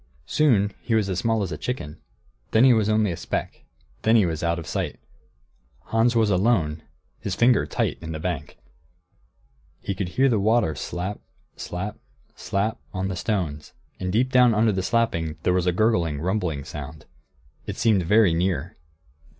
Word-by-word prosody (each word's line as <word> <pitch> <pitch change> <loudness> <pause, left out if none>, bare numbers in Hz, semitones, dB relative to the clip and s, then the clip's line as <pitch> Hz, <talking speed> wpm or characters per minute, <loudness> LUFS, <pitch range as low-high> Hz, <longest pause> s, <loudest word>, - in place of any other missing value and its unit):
Soon 105 - +2
he 115 - 0
was 105 -3 +1
as 90 - -1
small 115 -3 +1
as 90 - -4
a - - -5
chicken; 80 - -4 0.5
then 110 - +4
he 130 -1 +7
was 110 -2 +2
only 105 -2 +2
a - - -3
speck; - - -4 0.4
then 110 +1 +3
he 110 -4 +5
was 80 -3 -2
out 85 0 0
of 85 - -6
sight. 75 - -3 0.9
Hans 115 +2 +2
was 110 -2 +3
alone, 90 -6 +1 0.4
his - - -3
finger 120 0 +3
tight - - -1
in 80 -1 -6
the 80 - -4
bank. 85 -4 -4 1.2
He 100 - -3
could 95 -1 -3
hear 135 +8 +2
the 115 -5 +2
water, 110 -4 +2
slap, 90 +7 -4 0.4
slap, 100 +5 -5 0.4
slap, 105 +4 -2
on 95 -1 -2
the 95 - -3
stones; 85 -7 -3 0.3
and 90 0 -2
deep 125 +6 +1
down 125 -3 +5
under 110 +1 +3
the 95 -1 -1
slapping 85 -8 0
was 90 0 +2
a - - +4
gurgling, 85 -7 +1
rumbling 90 -5 -1
sound. 75 +2 -8 0.6
It - - -5
seemed 115 -4 +3
very 100 +1 +4
near. 85 -1 -1
95 Hz, 170 wpm, -24 LUFS, 85-110 Hz, 1.2 s, he